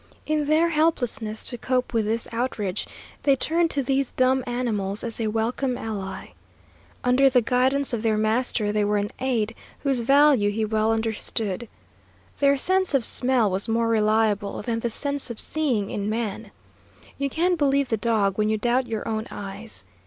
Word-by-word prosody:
In 305 -1 0
their 315 +3 +3
helplessness 250 -9 0
to 245 - -6
cope 255 0 -1
with 225 -2 +1
this 225 +2 -1
outrage, 230 -5 -2 0.3
they 280 -2 +4
turned 330 +5 +1
to 280 -3 -1
these 270 +1 0
dumb 255 0 +2
animals 215 -5 -2
as 230 -1 -5
a 220 - 0
welcome 240 +4 -1
ally. 200 -5 -5 0.7
Under 255 +2 +4
the 255 -1 +4
guidance 260 +3 +1
of 230 - -1
their 220 -1 +1
master 220 0 +1
they 210 0 +1
were 205 0 +1
an 205 +1 -2
aid 235 -4 0 0.3
whose 270 -3 +1
value 275 -3 +4
he 215 +1 -1
well 215 +1 +1
understood. 220 -1 -2 0.7
Their 280 0 +4
sense 375 +2 +2
of 255 -5 +3
smell 245 -5 +1
was 190 +2 -2
more 230 0 +1
reliable 215 -2 +1
than 230 0 -1
the 235 - -1
sense 280 +4 -1
of 235 - -6
seeing 255 -11 -1
in 205 0 -2
man. 220 -1 -3 0.7
You 280 0 0
can 350 +5 +1
believe 280 -3 +1
the 225 - +2
dog 215 -3 +1
when 215 0 +2
you 220 - +1
doubt 245 +3 +1
your 220 -2 -4
own 220 0 -2
eyes. 205 - -6
230 Hz, 175 wpm, -24 LUFS, 215-265 Hz, 0.7 s, they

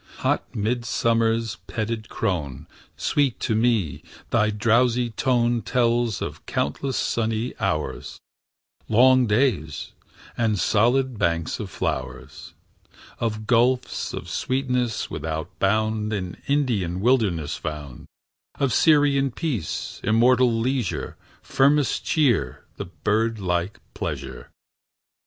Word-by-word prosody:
Hot - - +1
midsummer's 115 -1 0
petted 110 +2 -3
crone, 80 - -3 0.3
Sweet 140 -5 +1
to - - 0
me 110 -7 +1 0.3
thy 110 -2 +3
drowsy 120 +3 +2
tone 120 -1 +1
Tells 120 -1 +1
of - - -6
countless 130 - -2
sunny 115 +1 -1
hours, 95 -8 -3 0.7
Long 130 +2 +5
days, 105 - 0 0.4
and 110 -3 +1
solid 120 +6 +2
banks 85 -1 0
of - - -5
flowers; 65 -1 -5 0.6
Of 110 -2 -2
gulfs 125 +2 +1
of - - -6
sweetness 125 -3 -1
without 80 -1 -5
bound 110 +2 +1
In 90 -3 -4
Indian 115 -12 0
wildernesses 100 - +1
found; 75 -5 -7 0.5
Of 140 -3 +1
Syrian 145 -3 +4
peace, 130 - -4
immortal 120 +3 +4
leisure, 115 -2 -1 0.3
Firmest 140 +1 +2
cheer, 120 - +1
and - - -5
birdlike 105 -4 0 0.2
pleasure. 65 -3 -5
115 Hz, 100 wpm, -24 LUFS, 95-125 Hz, 0.7 s, Long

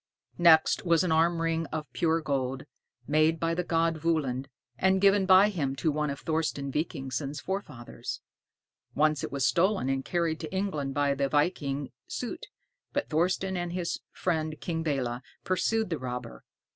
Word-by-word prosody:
Next 165 -2 +5
was 170 -2 +3
an 180 - 0
arm 165 +1 +3
ring 165 -1 0
of 155 -1 -4
pure 165 -1 +1
gold, 135 -3 -2 0.4
made 155 +2 +3
by 165 +1 0
the 180 +1 -1
god 165 -1 +1
Völund, 145 -5 0 0.3
and 190 +5 +3
given 195 0 +4
by 190 +2 +7
him 145 -9 -2
to 140 +4 0
one 150 0 -1
of 140 - -5
Thorsten 155 -4 -1
Vikingsson's 140 -1 -3
forefathers. 190 -11 -5 0.8
Once 150 0 +2
it - - -4
was 140 -1 0
stolen 190 -5 +2
and 135 0 0
carried 170 -1 -1
to 160 - -6
England 170 -8 -2
by 145 -1 +2
the 140 0 0
viking 145 -3 0 0.2
Soté, 250 - -5 0.5
but 285 - -1
Thorsten 185 +4 +1
and 175 -1 -3
his 175 -2 -2
friend 160 -3 -2
King 165 -2 -3
Belé 130 -6 -1 0.2
pursued 215 +3 0
the 165 - -1
robber. 125 -2 -6
160 Hz, 160 wpm, -28 LUFS, 140-175 Hz, 0.8 s, by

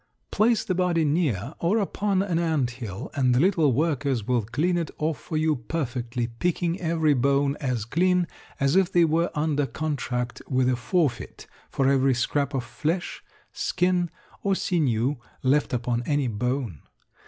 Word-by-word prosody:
Place 220 0 +3
the 185 - -1
body 175 -3 +1
near 145 - 0
or 180 +6 +2
upon 200 -2 0
an 175 -4 0
ant 155 -7 +1
hill 115 -6 -7
and 130 -4 +2
the - - +3
little 165 -4 +3
workers 140 -4 0
will 125 0 +2
clean 150 - 0
it 170 -4 -1
off 155 0 -1
for 155 - -4
you 155 -1 +2
perfectly, 125 -2 -3
picking 170 +9 -1
every 160 -3 +2
bone 140 +1 +2
as 125 -6 -1
clean 180 +7 +2 0.3
as 140 +3 +2
if 190 -1 +3
they 175 -2 +5
were 165 +2 +1
under 150 -2 +1
contract 125 -6 -3
with 130 -1 +1
a 130 - +3
forfeit 135 +1 -1 0.2
for 135 - +1
every 135 -1 +3
scrap 140 +3 0
of 130 - -1
flesh, 165 +7 -3 0.3
skin, 180 -1 0 0.3
or 195 -1 +1
sinew 140 - +1 0.3
left 140 +3 +2
upon 120 -1 -1
any 145 -3 +1
bone. 120 - -2
145 Hz, 160 wpm, -25 LUFS, 125-170 Hz, 0.3 s, they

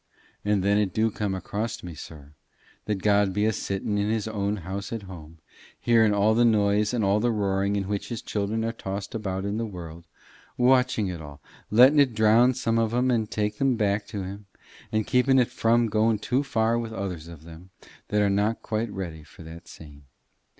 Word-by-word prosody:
And 105 -2 +1
then 100 +1 +3
it 100 -4 -1
do 110 0 +2
come 100 -2 -2
across 110 +4 -4
me, 90 -1 -7
sir, 75 -1 -11 0.5
that 100 -3 -3
God 100 -2 +3
be 105 +2 +1
a 110 - +2
sitting 100 +1 -2
in 100 +1 0
his 110 -1 -1
own 105 -1 -1
house 100 +2 -5
at 115 -3 -4
home, 85 -4 -11 0.4
hearing 115 -2 +4
all 105 +2 +3
the 120 +2 +3
noise 105 -2 +3
and 120 -3 -1
all 100 +1 +2
the 120 +3 +1
roaring 100 -2 0
in 100 - 0
which 100 -1 -3
his 115 -3 -5
children 110 +2 -2
are 115 - -1
tossed 100 -3 -6
about 95 -3 -3
in 100 +1 -2
the 115 - -2
world, 85 -4 -9 0.5
watching 125 -3 +3
it 85 -3 -6
all, 75 -1 -11 0.3
letting 130 +7 +6
it 130 -5 +3
drown 115 +4 +4
some 115 -2 0
o' 115 - +2
them 125 +3 +1
and 110 -3 0
take 105 -1 -2
them 135 -2 +2
back 105 -2 0
to 105 -3 -5
him, 100 +2 -8 0.4
and 110 -1 0
keeping 130 +1 +3
it 125 -2 +2
from 115 +1 +2
going 110 0 +2
too 125 +6 0
far 115 -3 +1
with 115 -1 -5
others 90 -5 -5
of 85 -2 -12
them 85 +3 -13 0.4
that 105 0 +1
are - - +3
not 105 +3 0
quite 110 0 -2
ready 85 -6 -6
for 75 +2 -15
that 80 +1 -11
same. 70 -2 -13
105 Hz, 205 wpm, -26 LUFS, 95-115 Hz, 0.5 s, letting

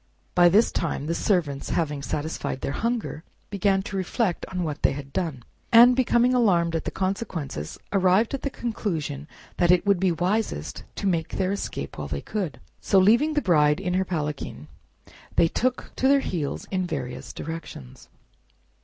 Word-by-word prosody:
By 175 -1 +6
this 210 +6 +4
time 165 -4 -2
the 165 - -1
servants, 165 -8 0
having 150 -4 -1
satisfied 145 0 -3
their - - -2
hunger, 225 -4 -2 0.3
began 195 -1 +1
to 195 - -6
reflect 190 0 -1
on 180 -1 -3
what 150 -3 -4
they - - +3
had 140 0 -8
done, 155 -9 -2 0.3
and 240 +2 +8
becoming 250 -1 +3
alarmed 175 -9 +3
at 165 - -2
the - - -1
consequences, 185 - -3 0.2
arrived 195 +4 +3
at 275 - -2
the 280 - -2
conclusion 160 - -3 0.3
it 175 +1 +4
would 200 -2 +3
be 190 -1 +2
wisest 185 +7 -2
to - - -4
make 170 -4 +1
their 190 0 -1
escape 200 - -4
while - - -4
they - - -3
could. 190 -9 -4 0.2
So, 195 - +2
leaving 235 +11 +4
the 295 - +1
Bride 150 -4 +4
in 180 -2 -2
her 185 +1 +2
palanquin, 150 - -4 0.7
they 165 - +5
took 250 +8 -1
to 265 - +2
their 275 0 +5
heels 160 - -3
in 185 -2 0
various 135 -6 -5
directions. 155 - -8
180 Hz, 170 wpm, -25 LUFS, 155-210 Hz, 0.7 s, and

